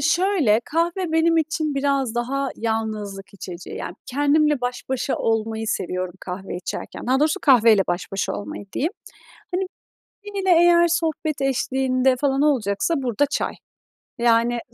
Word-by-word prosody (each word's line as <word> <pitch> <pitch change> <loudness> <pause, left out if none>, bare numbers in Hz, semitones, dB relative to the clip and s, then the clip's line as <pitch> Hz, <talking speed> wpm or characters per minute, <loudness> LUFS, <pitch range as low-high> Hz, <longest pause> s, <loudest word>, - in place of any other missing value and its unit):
Şöyle, 315 - +3
kahve 335 +1 -1
benim 330 +1 +3
için 315 -1 0
biraz 275 -4 0
daha 270 +3 -1
yalnızlık 215 -3 -3
içeceği, 180 -2 -8
yani, 175 - -5
kendimle 290 +1 +2
baş 245 0 -3
başa 265 +1 -1
olmayı 225 0 -1
seviyorum 185 -4 -2
kahve 185 0 -6
içerken. 180 - -6
Daha 260 +2 +2
doğrusu 305 0 +2
kahveyle 230 -6 +6
baş 175 +1 -2
başa 195 - -1
olmayı 205 0 -6
diyeyim. 320 +8 -1 0.6
Hani, 375 +1 0 0.6
biriyle 400 -2 -3
eğer 345 0 +6
sohbet 320 -3 -1
eşliğinde 265 -1 +1
falan 275 0 +1
olacaksa, 255 - +1
burada 245 +3 +1
çay. 285 - -2 0.6
Yani, 235 0 +3
265 Hz, 135 wpm, -22 LUFS, 220-310 Hz, 0.6 s, kahveyle